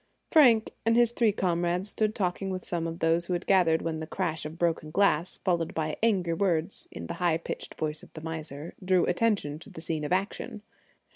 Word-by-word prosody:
Frank 245 -9 +6
and 230 0 +3
his 240 -1 +5
three 235 -2 +3
comrades 175 0 0
stood 215 +1 0
talking 190 0 -1
with 185 -1 -4
some 170 -2 -1
of 165 0 -5
those 165 +1 +1
who 180 - -1
had 175 +1 -2
gathered 175 -4 +3
when 160 -1 -2
the 160 - -5
crash 165 -4 -2
of 160 +2 -10
broken 165 -3 0
glass, 175 -1 +2
followed 170 -3 -1
by 155 -1 -1
angry 190 -7 +2
words 170 0 0
in 85 - -7
the - - -4
high 170 -2 +3
pitched 165 - -6
voice 155 0 -3
of - - -15
the 155 - -8
miser, 160 -1 -6
drew 185 -1 +3
attention 180 -6 +1
to - - -13
the - - -10
scene 160 -1 -2
of 150 - -4
action. 195 +2 -2
175 Hz, 210 wpm, -28 LUFS, 160-195 Hz, -, Frank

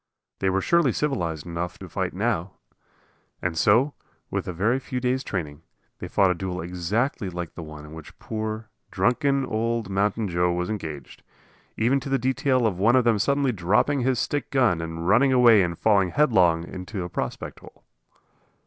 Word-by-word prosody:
They 95 - +1
were 95 +1 +1
surely 170 - +3
civilized 85 - -2
enough 85 0 -4
to - - -9
fight - - -2
now! 90 +3 -1 0.9
And 90 -2 -2
so, 120 - +3 0.4
with - - -2
a - - -2
very 105 +9 +1
few 130 -1 -4
days' 130 +1 0
training, 75 -6 -4 0.4
they - - -6
fought 95 -2 +3
a - - +2
duel 90 0 -4
exactly 95 - -2
like 85 -2 -6
the - - -8
one 75 -1 -9
in 75 - -12
which 80 -1 -11
poor, 110 0 -5 0.2
drunken 135 - +1
old 115 -2 -2
Mountain 105 +3 0
Joe 90 0 +1
was 90 +3 -2
engaged; 80 -10 -6 0.6
even 125 +5 +2
to 135 - -7
the 135 - +2
detail 130 0 +1
of 95 -5 0
one 115 +5 +4
of 130 - +4
them 115 -3 +2
suddenly 140 +3 +2
dropping 105 +8 +1
his 130 0 +1
stick 145 +6 -2
gun 120 -11 +2
and 80 +1 -5
running 130 +8 +4
away 120 -5 +6
and 85 -2 -1
falling 100 -4 +3
headlong 90 - +3
in 90 +1 -8
a 90 - -3
prospect - - -5
hole. - - -16
105 Hz, 180 wpm, -25 LUFS, 90-125 Hz, 0.9 s, away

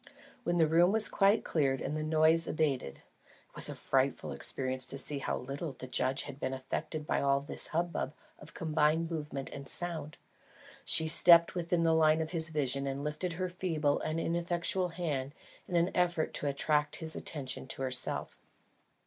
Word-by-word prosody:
When 175 -5 0
the 165 - +4
room 170 +4 +4
was 220 0 +5
quite 200 +2 +2
cleared 135 -4 0
and 150 - -4
the 155 - -3
noise 155 +1 +2
abated 140 - -1
(it - - -22 0.5
was - - +3
a - - -6
frightful - - -1
experience 130 -1 -2
to 135 - -3
see 140 +1 +2
how - - -2
little 140 +4 -6
the 130 - -9
judge 130 +1 -1
had 140 -1 -9
been 130 -1 -3
affected 150 +4 -5
by - - 0
all 140 0 +2
this 140 - 0
hubbub 170 -3 -3 0.2
of - - -14
combined 160 +1 0
movement 150 -4 -5
and 140 -1 -8
sound), 160 -4 -3 0.7
she 160 - +2
stepped 170 +1 +8
within 175 -1 -1
the 165 -1 +3
line 155 0 +4
of 160 -1 -3
his 160 -2 +2
vision 140 -3 -1
and 135 +1 -4
lifted 155 +4 -3
her 185 +2 -3
feeble 165 -5 -1
and 155 +1 -3
ineffectual 170 +2 -1
hand 150 -5 -4 0.3
in 180 - -4
an 170 +2 +2
effort 175 -3 0
to 145 - 0
attract 150 +1 0
his 160 -1 -5
attention 135 -4 -4
to 135 - -3
herself. 125 -1 -2
155 Hz, 180 wpm, -31 LUFS, 140-170 Hz, 0.7 s, stepped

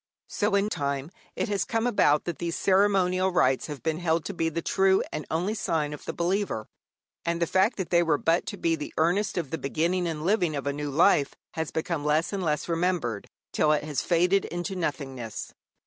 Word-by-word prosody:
So 205 0 0
in 200 +1 +2
time 140 -3 -2 0.2
it - - -1
has 200 -2 +1
come 225 +2 -1
about 150 -11 +3
that 175 - -4
these 170 -1 -2
ceremonial 190 -1 +3
rites 135 -7 +2
have 150 -3 -7
been 160 0 -1
held 165 -2 0
to 200 - -4
be 165 -2 0
the 165 +1 -4
true 190 0 +3
and 150 - -5
only 175 +6 0
sign 160 -8 -1
of 150 - -9
the - - -2
believer, 175 - -1 0.6
and 170 0 -1
the 170 - +2
fact 190 +7 +2
that 190 -4 -4
they 170 -1 +5
were 160 -3 +2
but 165 +3 +1
to - - -4
be 165 -1 +1
the 150 -2 -7
earnest 180 +6 +1
of 165 -6 -2
the 160 - -2
beginning 170 +6 0
and 160 -1 -4
living 180 -5 +2
of 140 - -4
a 140 - 0
new 145 0 -4
life 145 -1 +3 0.2
has 160 -1 -3
become 160 -1 -2
less 155 +5 +1
and 195 - -2
less 150 -4 -1
remembered, 165 - -1 0.3
till 150 - +3
it 150 - 0
has 150 -2 -2
faded 180 +3 +2
into 175 +3 -4
nothingness. 135 - -4
170 Hz, 210 wpm, -27 LUFS, 150-185 Hz, 0.6 s, they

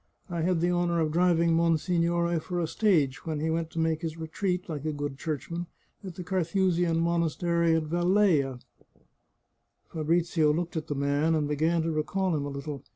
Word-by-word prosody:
I 170 -1 -2
had 175 0 +1
the 175 +1 +2
honour 175 -1 +1
of 155 -2 +1
driving 170 0 +3
monsignore 170 +1 +1
for 175 +2 -4
a 170 - +1
stage 160 -8 +1
when 155 -2 -2
he 160 +2 -1
went 165 0 -1
to 165 - -5
make 160 -1 0
his 165 -1 -4
retreat, 180 +3 -2
like 150 -5 -5
a 155 - -1
good 145 -1 -4
church 155 -2 -4
man, 170 +1 -4 0.4
at 185 -3 -7
the 180 - -6
Carthusian 175 -1 +1
monastery 170 0 +1
at 160 - +1
Velleia." 170 -5 +2 1.3
Fabrizio 160 0 +2
looked 170 +2 -2
at 160 - -3
the 145 - -3
man, 145 +3 +1
and 150 -2 0
began 160 +3 +1
to 165 - -1
recall 175 +3 0
him 145 -2 -2
a - - -4
little. 140 0 -6
165 Hz, 185 wpm, -28 LUFS, 155-175 Hz, 1.3 s, driving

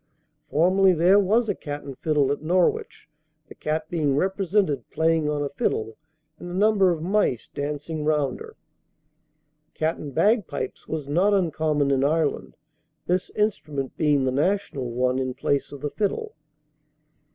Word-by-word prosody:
Formerly 185 +4 +4
there 180 +5 +5
was 220 +4 +2
a 205 - +1
"Cat 145 -4 -7
and 135 -2 -8
Fiddle 150 -3 +1
at 145 - -2
Norwich, 175 +3 0 0.4
the - - -10
Cat 155 +1 -3
being 155 -5 0
represented 190 - 0
playing 160 -1 +1
on 145 -1 -1
a 140 - -2
fiddle, 110 -5 -2 0.4
and 175 - -8
a 175 - -5
number 200 -1 +4
of 165 -3 -1
mice 185 - 0
dancing 150 +2 -4
round 150 -4 0
her." - - -11 1.2
Cat 160 +1 0
and 145 - -7
Bagpipes. 215 -2 0
Was 155 -3 -4
not 185 +8 +3
uncommon 155 -5 +1
in 135 -1 +2
Ireland, 155 +1 0 0.5
this 180 +3 0
instrument 150 -10 -2
being 150 -3 +2
the 130 - +1
national 145 -3 -1
one 125 +2 0
in 130 -1 -2
place 140 -1 -1
of 145 -2 -9
the 145 - -3
fiddle. 430 - -2
155 Hz, 150 wpm, -24 LUFS, 145-185 Hz, 1.2 s, there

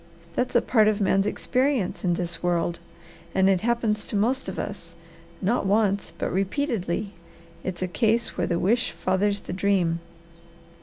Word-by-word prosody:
That's 250 +4 -1
a 240 - +5
part 220 -4 +4
of 215 -1 +2
a - - +1
man's 195 +1 +3
experience 255 -2 0
in 175 -2 +2
this 175 -1 -4
world, 175 -1 0 0.6
and 190 0 +4
it 190 -2 +3
happens 225 -2 0
to - - -5
most 245 +6 +1
of - - -6
us, 170 -4 -6 0.5
not 205 +1 +1
once, 200 -3 +2
but - - -2
repeatedly. 195 - -1 0.5
It's 185 -1 -3
a - - 0
case 225 +5 +1
where - - 0
the 170 - 0
wish 225 +8 +2
fathers 200 +2 0
the - - -6
dream." 185 -3 +1
200 Hz, 165 wpm, -25 LUFS, 185-225 Hz, 0.6 s, a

